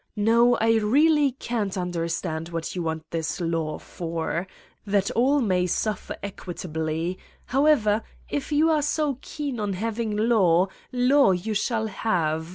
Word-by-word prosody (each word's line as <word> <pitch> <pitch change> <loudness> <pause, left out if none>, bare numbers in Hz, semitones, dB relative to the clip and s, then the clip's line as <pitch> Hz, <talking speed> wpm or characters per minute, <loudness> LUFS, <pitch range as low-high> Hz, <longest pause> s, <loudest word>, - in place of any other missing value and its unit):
No, 230 +3 +4
I 225 0 +3
really 285 +6 +3
can't 220 -6 -3
understand 170 -2 -3
what 165 0 -4
you 180 - -2
want 160 -1 -4
this 160 -2 -2
law 165 -3 -1
for! 170 +1 -4 0.4
That 200 -1 +1
all 270 +5 +3
may 185 -5 +1
suffer 215 +4 -2
equitably! 170 -2 -4 0.3
However, 255 -6 +3 0.3
if 290 +1 -4
you 310 +2 +4
are 305 -1 +2
so 290 -2 0
keen 285 -6 -5
on 205 -2 -1
hav 220 +4 -3
ing 215 -3 -1
law, 195 -5 +3 0.2
law 255 -2 +4
you 185 +5 -2
shall 220 +2 0
have. 165 -7 -1
205 Hz, 145 wpm, -25 LUFS, 170-240 Hz, 0.4 s, No